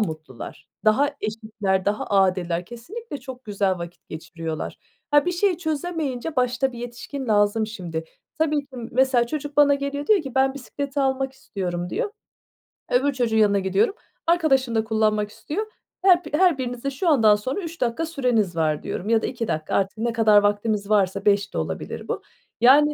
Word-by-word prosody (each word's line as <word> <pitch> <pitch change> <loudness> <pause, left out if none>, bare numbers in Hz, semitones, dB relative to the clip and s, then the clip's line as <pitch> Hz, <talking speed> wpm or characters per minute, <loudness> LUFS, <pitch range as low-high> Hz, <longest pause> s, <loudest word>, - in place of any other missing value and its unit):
mutlular, 155 - -6 0.2
daha 240 +7 +4
eşitler, 215 -3 -2
daha 205 +1 -1
adiller. 185 -3 +1
Kesinlikle 290 - -8
çok 255 0 -9
güzel 200 -3 0
vakit 170 0 -9
geçiriyorlar. 160 0 -5 0.3
Ha, 290 +3 +4
bir 360 - +1
şey 360 0 +2
çözemeyince 315 -3 -3
başta 250 +1 +1
bir 235 - -9
yetişkin 245 +3 -6
lazım, 205 +1 +3
şimdi. 175 -7 -5 0.3
Tabii 310 -1 +2
ki 280 - -17 0.2
mesela 255 -1 +3
çocuk 290 +2 -5
bana 290 -1 +6
geliyor 280 +1 -3
diyor 415 -6 +4
ki: 270 -3 -8
"Ben 265 0 +3
bisikleti 280 +1 -4
almak 265 0 0
istiyorum." 180 -8 -4
diyor. 455 0 -1 0.8
Öbür 275 +3 +3
çocuğun 240 -4 0
yanına 205 -2 +4
gidiyorum, 195 - +1 0.3
"Arkadaşın 270 -8 +3
da 220 - +2
kullanmak 215 -1 +1
istiyor. 370 - -4 0.4
Her 360 -2 +5
bi - - -6
her 345 -2 +4
birinize 250 +1 -3
şu 285 +7 -3
andan 225 -8 +6
sonra 255 - -3
3 330 -1 -8
dakika 245 +7 0
süreniz 245 - 0
var." 155 -2 0
diyorum 200 - -4
ya 225 -1 +4
da - - -2
2 235 -3 -3
dakika 155 0 -2
artık 195 +2 0
ne 235 +1 -1
kadar 220 -2 +5
vaktimiz 205 0 0
varsa 200 -1 +2
5 200 0 +2
de - - -3
olabilir - - -4
bu. - - -2 0.4
Yani 295 +4 +6
240 Hz, 175 wpm, -24 LUFS, 205-285 Hz, 0.8 s, bana